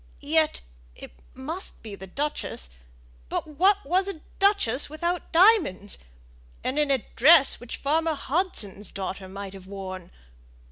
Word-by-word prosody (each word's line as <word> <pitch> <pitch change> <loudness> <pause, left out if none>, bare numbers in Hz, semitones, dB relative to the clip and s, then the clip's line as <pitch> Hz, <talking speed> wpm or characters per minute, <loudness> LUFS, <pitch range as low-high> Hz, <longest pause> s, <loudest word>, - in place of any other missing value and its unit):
Yet 310 +1 +2 0.3
it - - -11 0.2
must 310 +6 -7
be 215 -2 -8
the 190 -1 -9
duchess; 230 - -4 0.6
but - - -2
what 375 +7 +2
was 370 +6 +2
a 365 -6 -6 0.2
duchess 390 - +2
without 340 +3 -3
diamonds? 335 - +4 0.6
and 265 +4 -1
in 295 -1 +2
a 270 -4 +1
dress 280 +2 +7
which 245 -1 -6
farmer 320 +3 0
Hudson's 265 - -1
daughter 190 -1 -5
might 195 0 -7
have 190 -1 -12
worn! 190 -2 -7
280 Hz, 135 wpm, -26 LUFS, -, 0.6 s, dress